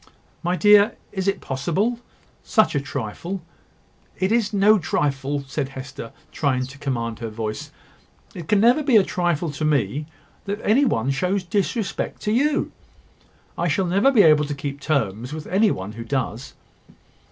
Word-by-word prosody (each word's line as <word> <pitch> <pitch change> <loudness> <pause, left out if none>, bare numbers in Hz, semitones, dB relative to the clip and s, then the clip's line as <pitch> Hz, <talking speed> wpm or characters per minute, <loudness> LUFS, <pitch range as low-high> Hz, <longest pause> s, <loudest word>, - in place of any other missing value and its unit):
"My 175 +1 0
dear! 205 +1 +5 0.2
is 190 -1 -3
it 195 0 0
possible?" 165 - -1
cried 240 0 -2
Edward. 240 - -25 0.4
"Such 220 -2 +3
a 140 - 0
trifle 140 - -5 0.4
." - - -35
"It 190 +2 +1
is 225 -2 +2
no 210 +1 +4
trifle," 140 -3 -1
said 135 0 -3
Hester, 130 -3 -8 0.2
trying 130 -4 0
to 135 +2 -12
command 115 -5 -3
her 115 -1 -4
voice; 110 0 -5 0.6
"it 170 -4 -8
can 210 - +3
never 240 +7 +5
be 270 -6 +4
a 205 - +6
trifle 175 -3 -1
to 145 +2 -5
me 150 0 0 0.4
that 200 +1 -3
any 255 +7 +4
one 130 - +1
shows 180 +8 0
disrespect 200 +3 -2
to 210 - 0
you. 285 +6 +1 0.8
I 175 - -1
shall 180 +5 +1
never 195 +9 +3
be 225 -7 +6
able 150 -2 +5
to 145 0 -4
keep 140 0 -5
terms 125 -4 -1
with 155 -1 -6
any 205 +4 +3
one 95 - -4
who 115 +2 -7
does." 125 -1 -3
155 Hz, 175 wpm, -23 LUFS, 135-200 Hz, 0.8 s, a